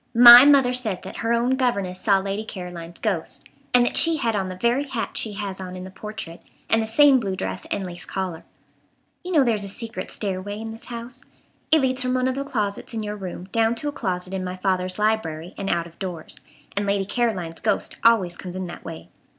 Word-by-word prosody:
"My 240 +2 +11
mother 275 -3 +5
says 225 -7 0
that - - -8
her 230 0 -1
own 240 +2 +2
governess 200 -8 -1
saw 200 -3 +4
Lady 195 +2 -3
Caroline's 175 -5 -8
ghost. - - -3 0.3
And 245 -1 +5
that - - -1
she 330 -1 +5
had 230 -6 0
on 190 -2 -1
the 185 - -6
very 240 +8 +1
hat 245 -5 -4
she 215 - -2
has 195 -2 -5
on 185 -1 -7
in 180 - -7
the 185 - -9
portrait, 210 -4 -8 0.3
and 225 - +4
the 220 - -3
same 275 +3 +6
blue 195 -5 -2
dress 95 - -5
and 195 - -2
lace 175 -1 -7
collar. 185 -4 -4 0.8
You 365 - -5
know 305 -6 +5
there's 225 -5 +1
a - - -3
secret 225 +4 -5
stairway 200 0 -4
in 225 0 -6
this 225 +1 -11
house. 235 +1 -8 0.5
It 315 -1 +6
leads 260 0 +1
from 255 0 0
one 255 0 +1
of 260 - 0
the 275 +1 -3
closets 215 -4 -3
in 220 - -2
your 210 0 -4
room 185 -3 -7
down 225 0 +2
to 290 +5 -3
a - - -4
closet 185 -7 -3
in 190 -1 -2
my 180 0 -4
father's 185 -1 -1
library 185 -6 -1
and 195 0 -4
out 170 -1 0
of 170 -1 -15
doors, 180 -5 -6 0.4
and 200 0 -1
Lady 200 -1 +1
Caroline's 195 -7 -1
ghost 210 -2 -1
always 205 -7 +4
comes 180 0 -8
in 185 0 -3
that 175 - -9
way." 165 -1 -9
210 Hz, 225 wpm, -23 LUFS, 185-240 Hz, 0.8 s, My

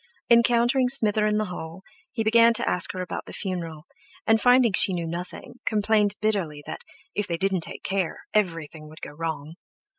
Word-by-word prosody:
Encountering 240 +2 +3
Smither 215 -5 +3
in 210 0 0
the 215 - -1
hall, 175 -1 -8 0.3
he 225 -1 -3
began 230 +1 +4
to - - -1
ask 180 - +1
her 185 - -4
about 180 - -7
the - - -10
funeral, 170 -5 -6 0.4
and, 225 0 +3
finding 245 -2 +4
that - - +7
she 205 -2 +7
knew 170 -1 -3
nothing, 175 +8 -8
complained 210 -1 +1
bitterly 185 -9 -2
that, - - -7 0.3
if 205 0 -2
they 170 - -3
didn't 190 0 -1
take - - -4
care, 190 -3 -3
everything 165 -6 -2
would 155 - -15
go - - -7
wrong. 160 0 -6
195 Hz, 185 wpm, -24 LUFS, 165-220 Hz, 0.4 s, that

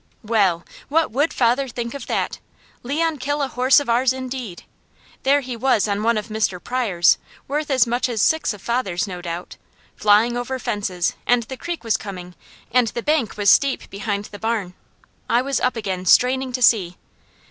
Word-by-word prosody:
Well! 200 -6 +1 0.2
What 320 +2 +2
would 285 +7 +1
father 250 +3 +1
think 235 -1 -5
of 280 -3 -7
that! - - -2 0.4
Leon 310 +5 -1
kill 290 +3 -1
a - - 0
horse 260 +2 +4
of 285 - -5
ours 245 +2 +3
indeed! 255 -7 -6 0.6
There 280 +2 +3
he 255 -2 -6
was 235 -3 +2
on 205 0 -1
one 230 +1 +2
of 215 +2 -4
Mr. 215 -4 -1
Pryor's, 210 -9 +2 0.3
worth 295 +2 -2
as 260 -4 +4
much 240 +2 -1
as 230 -3 -2
six 315 +9 +2
of 205 -3 -9
father's 235 -7 -1
no 180 -3 -7
doubt, 175 0 -6 0.4
flying 215 +3 +3
over 250 +2 -3
fences, 195 -7 -2
and 245 -1 +3
the 260 +4 -7
creek 340 +4 -5
was 225 -2 +1
coming, 180 -3 -8 0.4
and 245 -1 +3
the 235 +1 -4
bank 295 -9 0
was 205 -1 +5
steep 275 -2 +2
behind 200 +1 -3
the 205 - -10
barn. 220 -5 -2 0.6
I 240 +2 +3
was 275 0 -1
up 255 - 0
again 190 -4 -4
straining 260 +5 +4
to 250 0 -1
see. 185 -7 +3
235 Hz, 185 wpm, -21 LUFS, 205-260 Hz, 0.6 s, was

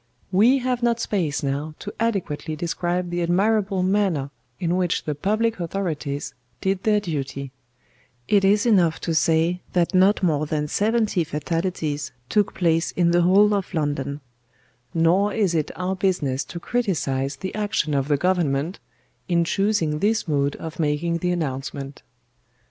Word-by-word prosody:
We 225 +8 +5
have 250 -1 -1
not 235 -1 +2
space 165 -11 -1
now 145 +3 -2
to 205 - -7
adequately 180 -9 -1
describe 175 +2 -2
the 175 0 -1
admirable 195 +2 +1
manner 185 -8 +1 0.3
in 175 0 0
which 180 -2 0
the 150 - -2
public 215 +8 0
authorities 160 -5 -3 0.3
did 190 -1 0
their 210 0 +3
duty; 140 -7 -4 0.8
it 200 -2 +3
is 205 +3 +4
enough 180 -8 +3
to 165 - -1
say 165 +2 +2
that 175 0 +1
not 190 +2 +4
more 155 -3 +1
than 150 -1 -1
seventy 215 0 +1
fatalities 155 -2 -2 0.2
took 205 -1 +1
place 165 -2 +2
in 170 -1 +2
the 175 0 +4
whole 200 +4 +5
of 195 -2 -2
London; 145 -2 -2 0.7
nor 180 +5 +2
is 200 -6 +1
it 155 -2 0
our 185 +1 -2
business 175 -9 0
to 170 - -7
criticise 155 - -1
the 190 +8 -6
action 205 -7 -1
of 135 -1 0
the 145 -1 +2
Government, 170 -1 0 0.5
in 170 -1 +3
choosing 170 -4 0
this 215 +3 +1
mode 140 -2 +1
of 160 0 -8
making 165 +2 0
the 180 - -1
announcement. 140 -4 -3
175 Hz, 150 wpm, -23 LUFS, 150-200 Hz, 0.8 s, We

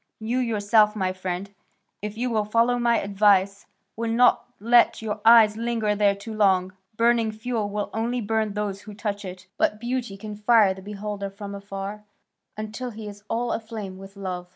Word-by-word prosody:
You 230 +3 -1
yourself, 215 -2 +3
my 185 -3 -1
friend, 185 +1 -5 0.5
if 210 +1 -5
you 245 +1 -1
will 215 -2 +1
follow 230 +3 +2
my 235 -1 +3
advice, 200 -1 +2 0.3
will 230 +1 -2
not 245 +2 +3
let 235 +1 +4
your 215 -1 -2
own - - -24
eyes 225 -2 +7
linger 230 -2 0
there 205 -1 +3
too 200 +3 -8
long; 190 -3 +2 0.2
burning 230 -1 +3
fuel 220 -1 -3
will 205 0 -3
only 235 +3 -1
burn 220 -1 -1
those 205 -1 -3
who 210 0 -11
touch 205 -1 -4
it, 185 0 -8
but 210 - +1
beauty 240 -3 -3
can 210 +1 -7
fire 210 -2 +4
the 190 - -12
beholder 205 0 -5
from 200 +1 -8
afar, 200 +1 -6 0.5
until 215 +4 -5
he 220 -2 -8
is 205 0 -9
all 235 +1 -1
aflame 215 -4 -5
with 195 +1 -12
love." 180 -2 -5
210 Hz, 180 wpm, -24 LUFS, 200-230 Hz, 0.5 s, eyes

